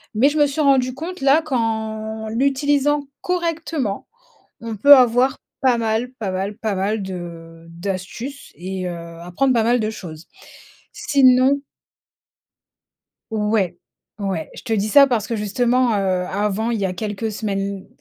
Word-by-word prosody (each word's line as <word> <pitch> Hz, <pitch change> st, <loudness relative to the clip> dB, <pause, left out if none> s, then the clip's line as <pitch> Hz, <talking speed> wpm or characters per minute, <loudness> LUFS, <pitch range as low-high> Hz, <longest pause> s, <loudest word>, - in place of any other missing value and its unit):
Mais 255 Hz, +7 st, +4 dB
je 300 Hz, -, -3 dB
me 295 Hz, -, +5 dB
suis 285 Hz, +3 st, -2 dB
rendue 265 Hz, -3 st, +3 dB
compte 330 Hz, +4 st, -7 dB
là 275 Hz, +4 st, +4 dB
qu'en 220 Hz, -4 st, -2 dB
l'utilisant 280 Hz, +4 st, +1 dB, 0.2 s
correctement, 330 Hz, -, -2 dB, 0.5 s
on 230 Hz, -1 st, -5 dB
peut 285 Hz, +8 st, +9 dB
avoir 250 Hz, +1 st, +3 dB, 0.3 s
pas 255 Hz, -3 st, +3 dB
mal, 225 Hz, +2 st, -1 dB
pas 215 Hz, -6 st, -4 dB
mal, 195 Hz, +2 st, -3 dB
pas 215 Hz, -2 st, -2 dB
mal, 200 Hz, +3 st, -1 dB
de, 190 Hz, -1 st, -5 dB
heu, 165 Hz, -2 st, -9 dB
d'astuces 195 Hz, +10 st, -6 dB
et 185 Hz, +1 st, -5 dB
heu, 175 Hz, -1 st, -5 dB, 0.2 s
apprendre 180 Hz, +10 st, 0 dB
pas 230 Hz, -, +3 dB
mal 240 Hz, +2 st, +2 dB
de 215 Hz, -, -1 dB
choses. 170 Hz, -7 st, -9 dB, 0.7 s
Sinon 275 Hz, -8 st, +4 dB, 1.7 s
Ouais, 210 Hz, -5 st, 0 dB, 0.4 s
ouais, 190 Hz, -6 st, -3 dB
je -, -, -10 dB
te 230 Hz, -, -4 dB
dis 210 Hz, -1 st, +1 dB
ça 275 Hz, +6 st, +7 dB
parce 235 Hz, -6 st, 0 dB
que, 230 Hz, -, -3 dB
justement, 240 Hz, +3 st, +1 dB
heu, 185 Hz, -2 st, 0 dB
avant, 210 Hz, +4 st, -1 dB
il 230 Hz, -, -1 dB
y -, -, 0 dB
a 185 Hz, -, -3 dB
quelques 215 Hz, +3 st, -4 dB
semaines, 200 Hz, -2 st, -3 dB
220 Hz, 155 wpm, -21 LUFS, 195-265 Hz, 1.7 s, peut